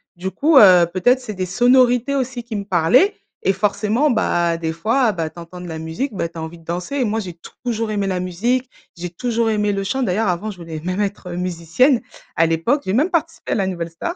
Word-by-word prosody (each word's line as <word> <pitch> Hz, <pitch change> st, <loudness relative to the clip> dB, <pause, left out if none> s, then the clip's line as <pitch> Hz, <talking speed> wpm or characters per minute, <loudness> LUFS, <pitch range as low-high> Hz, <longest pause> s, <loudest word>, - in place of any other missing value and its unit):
du 180 Hz, +2 st, -4 dB
coup, 295 Hz, +9 st, +3 dB
heu, 185 Hz, -7 st, +8 dB
peut-être 220 Hz, +9 st, +3 dB
c'est 245 Hz, -4 st, -7 dB
des 185 Hz, -1 st, -3 dB
sonorités 245 Hz, +5 st, +3 dB
aussi 260 Hz, -2 st, -2 dB
qui 230 Hz, -1 st, -6 dB
me 200 Hz, -, -2 dB
parlaient 205 Hz, -, +3 dB, 0.3 s
et 195 Hz, -, +3 dB
forcément, 215 Hz, +8 st, +1 dB
bah, 175 Hz, -7 st, +1 dB
des 165 Hz, -1 st, -2 dB
fois, 220 Hz, +7 st, +1 dB
bah, 165 Hz, -3 st, -3 dB
tu 170 Hz, -, -12 dB
entends 170 Hz, +1 st, -10 dB
de 180 Hz, -, -8 dB
la 160 Hz, -1 st, -6 dB
musique, 160 Hz, -, -4 dB
bah, 170 Hz, -, -2 dB
tu 170 Hz, -, -13 dB
as -, -, -4 dB
envie 165 Hz, +1 st, -8 dB
de -, -, -19 dB
danser. 175 Hz, -, -4 dB
Et 265 Hz, -, +2 dB
moi 220 Hz, +1 st, -1 dB
j'ai 185 Hz, -5 st, -6 dB, 0.3 s
toujours 230 Hz, -2 st, -1 dB
aimé 205 Hz, -1 st, -1 dB
la 185 Hz, -2 st, -1 dB
musique, 235 Hz, +9 st, -1 dB, 0.3 s
j'ai 175 Hz, +1 st, -5 dB
toujours 230 Hz, +5 st, -1 dB
aimé 210 Hz, -1 st, +1 dB
le 195 Hz, 0 st, -2 dB
chant. 265 Hz, +7 st, -1 dB
D'ailleurs 215 Hz, +1 st, 0 dB
avant, 185 Hz, +4 st, -1 dB
je 195 Hz, -, -12 dB
voulais 165 Hz, -2 st, -7 dB
même 185 Hz, +3 st, -2 dB
être, 200 Hz, -2 st, -3 dB
heu, 175 Hz, -, -5 dB
musicienne, 180 Hz, -, +1 dB, 0.3 s
à 165 Hz, -, +4 dB
l'époque, 165 Hz, -, +1 dB
j'ai 190 Hz, -, -1 dB
même 290 Hz, -, +2 dB
participé 330 Hz, -2 st, -2 dB
à -, -, 0 dB
la 195 Hz, -, +1 dB
Nouvelle 170 Hz, -3 st, -4 dB
Star. 255 Hz, -, -5 dB
200 Hz, 240 wpm, -20 LUFS, 175-245 Hz, 0.3 s, heu